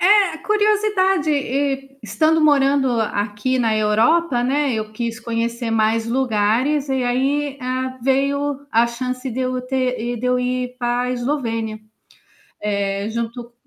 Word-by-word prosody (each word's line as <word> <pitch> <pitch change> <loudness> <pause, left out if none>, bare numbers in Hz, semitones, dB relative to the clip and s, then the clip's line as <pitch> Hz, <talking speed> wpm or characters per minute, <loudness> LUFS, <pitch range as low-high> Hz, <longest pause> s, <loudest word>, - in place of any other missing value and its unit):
É, 390 -3 +4
curiosidade 415 -5 +2
e 275 -1 -1
estando 310 +9 +2
morando 280 -2 +3
aqui 210 +4 -1
na 225 -3 +1
Europa, 240 +6 +2
né, 280 +1 +1
eu 215 -1 -3
quis 230 0 -4
conhecer 235 0 -2
mais 225 +1 +1
lugares 255 +4 +1
e 265 -1 0
aí, 275 +3 0
ah, 255 +1 -3
veio 275 +2 0
a 230 +1 +4
chance 255 +2 -4
de 255 +1 -3
eu 255 0 -1
ter 255 0 -1
e 240 +1 -2
de 235 - -6
eu 250 0 +2
ir 250 0 -2
para 240 0 0
a 250 - -2
Eslovênia. 235 -4 -2 0.8
Eh, 200 -1 -1
junto 235 +1 -5
255 Hz, 140 wpm, -20 LUFS, 230-280 Hz, 0.8 s, É